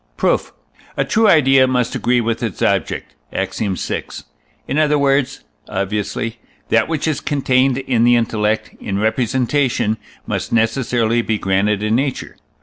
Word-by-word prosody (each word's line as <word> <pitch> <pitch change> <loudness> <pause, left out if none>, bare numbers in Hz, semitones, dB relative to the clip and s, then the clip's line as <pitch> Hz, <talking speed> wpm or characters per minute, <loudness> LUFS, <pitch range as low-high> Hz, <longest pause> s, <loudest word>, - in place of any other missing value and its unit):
Proof. - - +1 0.5
A - - +1
true 225 0 +3
idea 135 -7 +5
must 125 -2 0
agree 125 0 +1
with 115 0 -2
its 115 -6 -3
object - - -1 0.2
(Ax. - - -3
vi.); 100 -4 -2 0.6
in 145 - 0
other 150 -1 +3
words 135 -1 +1 0.3
(obviously), 105 +4 -3 0.3
that 115 0 +3
which 160 -1 -2
is 150 -2 -1
contained 130 -2 +1
in 130 -3 0
the 120 0 +5
intellect 110 -2 0
in 100 -1 -3
representation 120 +1 0 0.3
must - - -3
necessarily 115 0 +1
be 110 -2 -1
granted 100 +1 0
in 110 +1 0
nature. 135 +3 -2
120 Hz, 145 wpm, -18 LUFS, 110-135 Hz, 0.6 s, idea